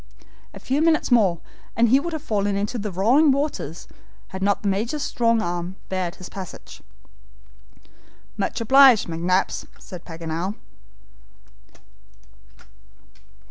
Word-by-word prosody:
A - - -11
few 275 +3 -1
minutes 320 -4 +2
more, 195 -8 +3 0.3
and 235 0 +3
he 265 +4 +5
would 340 +4 -4
have 315 - -5
fallen 205 -2 -1
into 210 +4 -2
the 210 0 -4
roaring 240 - +4
waters 270 - -3 0.4
had 190 0 -7
not 200 +1 +1
the - - -1
Major's 225 +9 -1
strong 230 -2 +1
arm 175 +1 -4
barred 185 -2 -2
his 185 - -10
passage. 190 -3 -10 1.5
"Much - - -2
obliged, 260 0 +6
McNabbs," 175 +3 -1
said 180 -2 -11
Paganel. 165 +3 -4
200 Hz, 120 wpm, -23 LUFS, 180-250 Hz, 1.5 s, obliged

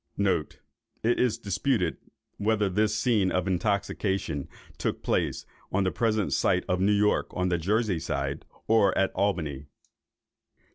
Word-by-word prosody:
It 95 -6 0 0.6
is 125 -3 +2
disputed 100 -2 0 0.4
whether 105 -1 +1
this 105 +3 +1
scene 110 -5 +2
of 90 -1 0
intoxication 95 -5 -1 0.3
took - - -2
place - - 0 0.3
on 100 +1 +1
the 95 - +1
present 110 -3 0
site 90 -1 +2
of 90 -1 0
New 100 +2 +3
York, 105 0 +2
on 90 0 0
the 85 -1 +1
Jersey 105 +1 +1
side, 70 0 -3 0.2
or 110 -4 +3
at 95 - +2
Albany. 80 -8 -1
100 Hz, 135 wpm, -27 LUFS, 90-105 Hz, 0.6 s, New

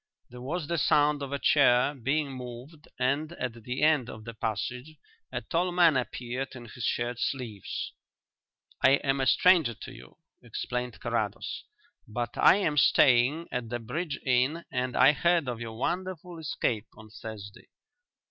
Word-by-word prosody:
There 125 0 -10
was 155 +6 -3
the 170 +1 -1
sound 145 0 +3
of 140 -1 -5
a 140 - -1
chair 135 -2 +4
being 140 +2 -1
moved 130 +5 -9
and 140 +6 0
at 125 -7 -4
the 125 +5 -3
end 150 -6 +3
of 110 0 -9
the 115 - -7
passage 115 +7 -4 0.4
a - - -3
tall 180 +2 0
man 175 -3 +5
appeared 125 +1 -3
in 120 -2 -9
his 125 +1 -9
shirt 120 0 -1
sleeves. 120 -7 -4 0.9
"I 135 - +7
am 135 0 +1
a 130 - +1
stranger 170 -10 +4
to - - -10
you," - - -14 0.2
explained 125 -1 -4
Carrados, - - -3 0.4
"but 120 +2 -4
I - - +6
am 165 -7 0
staying 135 +4 +4
at 125 -2 -3
the 120 - -2
Bridge 145 +6 -4
Inn 130 +6 +1
and 125 0 -2
I 135 +3 +7
heard 170 -1 +2
of 120 -2 -4
your 115 -1 -6
wonderful 180 +3 -3
escape 120 -7 -2
on 110 -1 -13
Thursday. 105 -3 -9
130 Hz, 160 wpm, -28 LUFS, 120-155 Hz, 0.9 s, I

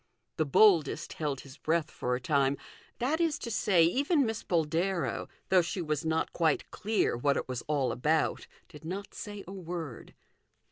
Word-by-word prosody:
The 155 - +1
boldest 170 -1 +4
held 145 -4 -3
his 140 0 -14
breath 160 +2 0
for 125 0 -1
a - - -3
time 140 +1 +2 0.4
that 295 +7 0
is 325 -3 +2
to 235 - -6
say, 190 -5 +4
even 280 - +3
Miss 220 -1 -2
Boldero, 170 +2 0 0.2
though 190 -2 +6
she 170 +3 -3
was 155 -2 -1
not 160 0 0
quite 160 -3 +1
clear 215 - 0
what 140 +4 +1
it - - -3
was 125 -2 -3
all 140 -5 +1
about, 150 +6 0 0.2
did 150 - -13
not 190 +5 -5
say 205 -2 -7
a 190 - -7
word. 170 -8 -6
165 Hz, 175 wpm, -30 LUFS, 145-195 Hz, 0.4 s, though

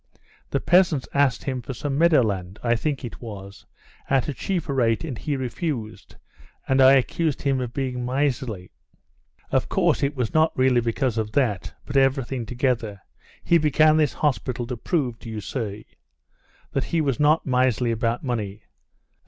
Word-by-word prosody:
The - - 0
peasants 175 -7 +3
asked 140 -3 +2
him 130 -3 -3
for 130 +2 -7
some 140 +1 -3
meadowland, 110 - +2
I 120 -1 +2
think 140 +2 -2
it 120 - -9
was, 100 -4 -9 0.4
at 135 -2 +2
a 145 - -2
cheaper 165 +1 -2
rate, 115 -2 +1
and 150 -6 -4
he 145 +6 -3
refused, 130 -3 -4 0.5
and 135 0 +3
I 130 +1 +8
accused 140 +3 +1
him 135 -2 +1
of 125 -2 -4
being 125 -2 -3
miserly. 125 -7 -2 0.8
Of - - +1
course - - +2
it 140 +1 0
was 125 -4 -2
not 160 0 +2
really 130 -2 +3
because 115 0 -1
of 105 -1 -3
that, 115 -10 0
but 140 - -2
everything 135 -3 +1
together, 120 -5 -1 0.4
he 170 - +4
began 155 +1 +4
this 150 -3 +2
hospital 130 -4 -1
to 125 +1 -4
prove, 125 -2 -2
do 115 - -9
you 110 -1 -5
see, 105 -1 -5 0.9
that 135 - -1
he 170 - -1
was 140 -6 0
not 150 +2 +3
miserly 125 -2 +2
about 115 +1 -1
money. 105 -5 -3
130 Hz, 165 wpm, -24 LUFS, 115-145 Hz, 0.9 s, I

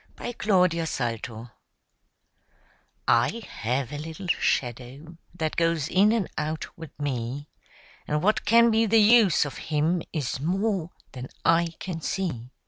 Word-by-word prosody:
[Pg 240 - -7
20] 180 -4 +4
MY 165 - -1
SHADOW 115 -4 -4 1.6
I 120 - +2
have 125 +2 -2
a 145 - -4
little 160 +5 -7
shadow 135 +1 -2 0.2
that 160 -3 -2
goes 165 -3 +1
in 200 +4 +4
and 225 -5 0
out 155 +1 -4
with 160 -3 -12
me, 140 0 -3 0.6
And 150 0 -1
what 215 +3 +2
can 230 +2 +5
be 225 +1 +3
the 225 +2 +4
use 215 -6 +5
of 145 - -7
him 160 +3 +1
is 140 -5 -3
more 185 +2 -1 0.2
than 130 -1 -7 0.2
I 165 0 +3
can 175 -3 -5
see. 150 -11 -3
160 Hz, 140 wpm, -26 LUFS, 135-190 Hz, 1.6 s, can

